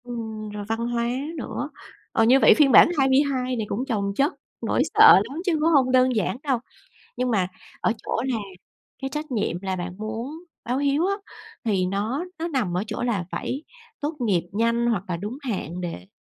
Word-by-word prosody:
Ừm, 220 -3 -6
rồi 205 0 -6
văn 225 0 -1
hóa 235 -1 0 0.3
nữa. - - -4 0.4
Ờ, 225 - +3
như 250 +4 +6
vậy - - +7
phiên 290 -3 +5
bản - - +8
22 265 -2 +2
này 220 -3 -2
cũng 245 +6 -2
chồng 200 -5 -1
chất 280 +5 +2 0.3
nỗi - - +1
sợ 435 +1 +9 0.2
lắm 300 +5 -5
chứ 365 - +2
cũng 315 +2 +3
hông 270 -5 +4
đơn 255 -1 +4
giản 215 +2 0
đâu. 270 -5 +1 0.6
Nhưng 250 +1 0
mà 190 -5 +1 0.3
ở - - +2
chỗ 230 - -2
là 255 -3 0 0.7
cái 270 - -1
trách 300 0 -4
nhiệm 215 -7 -1
là 190 -1 -2
bạn 180 0 -5
muốn 230 +10 -5 0.2
báo 250 +3 -1
hiếu 285 +4 +2
á, 395 - +1 0.5
thì 195 -5 +1
nó 215 - -2
nó 330 +1 -2
nằm 245 - -1
ở 185 - 0
chỗ 215 +1 -4
là 225 -7 0
phải 275 +4 -3 0.4
tốt 300 +2 -2
nghiệp 200 -8 +2
nhanh 230 +3 +1
hoặc 215 -6 0
là 175 - -1
đúng 210 +9 -6
hạn 190 - -4
để 165 - -6
235 Hz, 200 wpm, -24 LUFS, 205-275 Hz, 0.7 s, sợ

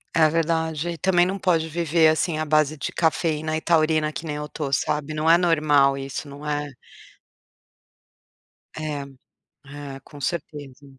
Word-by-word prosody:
É 160 -1 +6
verdade, 160 0 -1
e 170 - -6
também 175 +2 +3
não 190 +2 -2
pode 170 -4 +1
viver, 165 0 +2
assim, 155 +1 +1
à 155 - -1
base 155 0 +2
de 140 - -4
cafeína 155 -1 0
e 160 - -2
taurina 155 -2 +2
que 155 +3 -7
nem 150 -2 -3
eu 150 0 -6
tô, 145 -2 -4
sabe? 150 +2 -1
Não 155 +1 0
é 165 - +7
normal, 150 -5 +3
isso, 135 +2 -6
não 145 +1 -10
é! 145 0 -1 2.1
É, 155 -2 -4 0.7
é 140 -1 -8
com 145 - -13
certeza. 145 -3 -5
155 Hz, 160 wpm, -23 LUFS, 145-165 Hz, 2.1 s, é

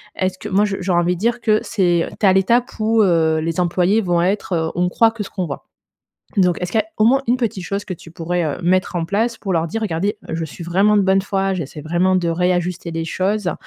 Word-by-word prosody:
est-ce 185 0 -1
que 210 - -6
moi, 200 +2 +3
je 200 -2 -2
j'ai 185 0 -2
envie 175 +1 +2
de 175 - -9
dire 235 +2 0
que 215 -2 +3
c'est 175 -5 +1
tu - - +1
es 195 - +7
à - - +4
l'étape 235 +6 +3
où, 220 0 +3
heu, 160 -3 +2
les 165 +2 -2
employés 180 +4 +2
vont 175 -4 +1
être, 190 0 -1
heu: 160 -1 0
«On 180 0 +1
croit 225 +4 +3
que 225 -2 -7
ce 195 - -9
qu'on 185 -3 -3
voit.» 140 - -7 0.7
Donc 180 -3 +2
est-ce 180 +1 -4
qu'il 220 - +3
y - - +1
a - - -20
au 215 - +3
moins 270 +4 +4
une 245 +2 +2
petite 215 -7 -3
chose 200 +2 -3
que 185 - -5
tu 165 - -14
pourrais, 170 +1 -2
heu, 150 - -2
mettre 185 +1 +1
en 165 - -1
place 225 +6 -1
pour 195 - -3
leur 165 -1 +1
dire: 225 +6 -4
«Regardez, 200 +3 -1
je 160 0 -3
suis 165 +3 -9
vraiment 195 +5 +3
de 205 - +4
bonne 190 0 +3
foi, 195 -1 -1
j'essaie 155 -3 -6
vraiment 175 +4 +1
de 175 -2 0
réajuster 175 0 -1
des 165 0 -3
choses», 190 +2 -1
185 Hz, 265 wpm, -19 LUFS, 170-210 Hz, 0.7 s, es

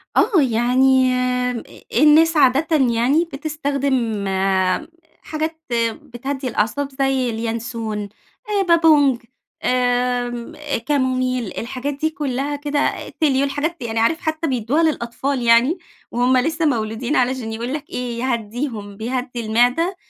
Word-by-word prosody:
آه 370 -8 +4
يعني 255 +1 +3
أ 250 -1 0 0.3
الناس 310 +4 +5
عادةً 295 +4 +4
يعني 260 +5 +2
بتستخدم 275 -7 -1 1.0
حاجات 315 +1 -4 0.4
بتهدي 265 0 -5
الأعصاب، 245 +5 -1
زي 270 -2 +1
اليانسون 225 -2 -4 0.4
آآ 410 -1 +1
بابونج، 305 -7 +4 0.4
آمم 245 0 0 0.3
كاموميل 255 -5 0
الحاجات 255 +4 -3
دي 305 +3 -1
كلها 285 -1 -2
كده 290 0 -1
تيليو 280 -4 +1
الحاجات 290 +5 -2
دي 245 - -5
يعني 225 -1 -2
عارف 315 +9 +2
حتى 315 0 -2
بيدّوها 260 +4 +1
للأطفال 270 -2 -1
يعني، 235 +8 +4 0.3
وهُم 250 +2 +2
لسه 320 +5 0
مولودين 235 0 -1
علشان 250 -3 0
يقول 235 +4 -4
لك 300 0 -5
إيه 245 -2 -4
يهدّيهم 230 -3 -3
بيهدّي 245 +2 -3
المعدة، 245 - +2
255 Hz, 115 wpm, -20 LUFS, 235-290 Hz, 1.0 s, الناس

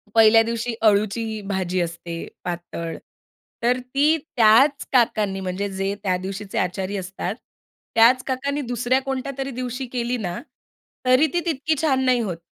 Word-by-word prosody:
पहिल्या 225 0 +7
दिवशी 230 +1 -2
अळूची 215 +1 +1
भाजी 185 -2 -1
असते 170 0 -5 0.2
पातळ. 170 -2 -5 0.7
तर 250 +2 +2
ती 280 +5 +2
त्याच 270 0 +4
काकांनी 215 -6 +2
म्हणजे 190 +2 -3
जे 195 +1 -2
त्या 185 -2 +1
दिवशीचे 195 +2 -6
आचारी 190 +2 -2
असतात 190 +1 -4 0.6
त्याच 245 +3 +6
काकांनी 280 +2 -1
दुसऱ्या 245 0 0
कोणत्यातरी 270 0 -4
दिवशी 255 +1 -4
केली 245 0 -1
ना, 180 -5 -4 0.7
तरी 255 +5 +5
ती 350 - +2
तितकी 315 -1 0
छान 270 -5 +2
नाही 255 -1 +3
होत. 185 -7 -3
225 Hz, 140 wpm, -23 LUFS, 195-255 Hz, 0.7 s, पहिल्या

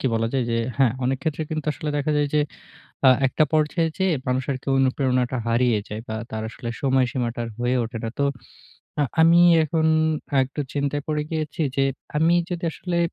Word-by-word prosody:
কি - - -1
বলা 115 0 0
যায় 130 -2 +1
যে - - +1 0.2
হ্যাঁ, 130 -5 +4
অনেক 130 +1 0
ক্ষেত্রে 155 +1 -2
কিন্তু 155 -1 -3
আসলে 150 0 -4
দেখা 145 +2 0
যায় 145 -1 +1
যে 150 - +4 0.7
আ - - +10 0.2
একটা 130 - +2
পর্যায়ে 155 +2 +2
যেয়ে 190 -2 +2
মানুষ 130 +1 +1
আরকি 130 0 -6
অনুপ্রেরণাটা 130 -1 +1
হারিয়ে 115 -1 +2
যায় 105 +1 -5
বা 110 - -3 0.2
তার 110 0 -3
আসলে 115 +1 -7
সময়সীমাটা 130 -3 0
আর - - -6
হয়ে 120 +1 +1
ওঠে 115 +1 -5
না। 115 - -2
তো 140 - +3 0.8
আ - - +4 0.2
আমি 165 +1 +6 0.2
এখন 160 0 0 0.6
একটু 135 +3 -5
চিন্তায় 145 0 -1
পরে 150 -1 0
গিয়েছি 155 +1 -3 0.2
যে 135 - +4 0.3
আমি 165 +3 +4 0.2
যদি 175 -1 -4
আসলে 180 -2 -3
135 Hz, 185 wpm, -23 LUFS, 125-155 Hz, 0.8 s, আ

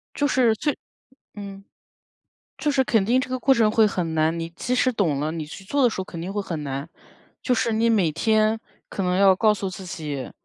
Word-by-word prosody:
就 290 - +1
是 250 -4 +3
最 290 +6 -2 0.6
嗯， 200 -1 -9 0.9
就 295 - 0
是 265 -1 +2
肯 220 -6 +2
定 250 +3 +3
这 - - -6
个 255 - -1
过 270 +1 +4
程 225 -4 +3
会 220 0 +4
很 170 -5 -2
难。 160 +1 +1
你 165 0 -4
即 240 +9 -4
使 255 0 +2
懂 165 - 0
了， 155 +2 -1
你 160 -2 -5
去 180 +6 -10
做 275 +8 0
的 245 - +5
时 220 - -6
候 - - -4
肯 170 -2 -9
定 185 +4 -5
会 205 - -1
很 165 -6 -5
难， 140 +2 -5 0.5
就 255 - +1
是 235 -1 0
你 230 +1 +2
每 195 -8 +2
天 220 +5 +2 0.3
可 195 - -3
能 180 0 0
要 195 -1 +6
告 215 +1 +3
诉 195 -2 -4
自 185 0 -9
己 150 -6 -5
200 Hz, 245 characters per minute, -23 LUFS, 165-230 Hz, 0.9 s, 要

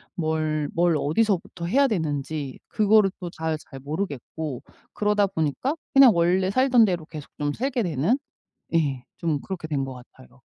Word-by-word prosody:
뭘, 155 -3 -1
뭘 170 -1 +3
어디서부터 175 +1 0
해야 275 +10 +3
되는지 150 - -3
그거를 215 -2 +4
또 180 -3 -5
잘 160 -2 -3
잘 135 - -9
모르겠고 150 -2 -4 0.3
그러다 210 -1 +2
보니까 165 - -1 0.2
그냥 270 -3 +8
원래 180 +3 +2
살던 255 0 +5
대로 175 -5 -2
계속 155 -3 -9
좀 145 0 0
살게 250 -1 -1
되는 175 - +1 0.6
예 140 -6 +1
좀 155 -4 -1
그렇게 185 -4 -5
된 140 -3 -1
것 135 - -6
같아요. 130 +1 -16
165 Hz, 300 characters per minute, -25 LUFS, 145-205 Hz, 0.6 s, 그냥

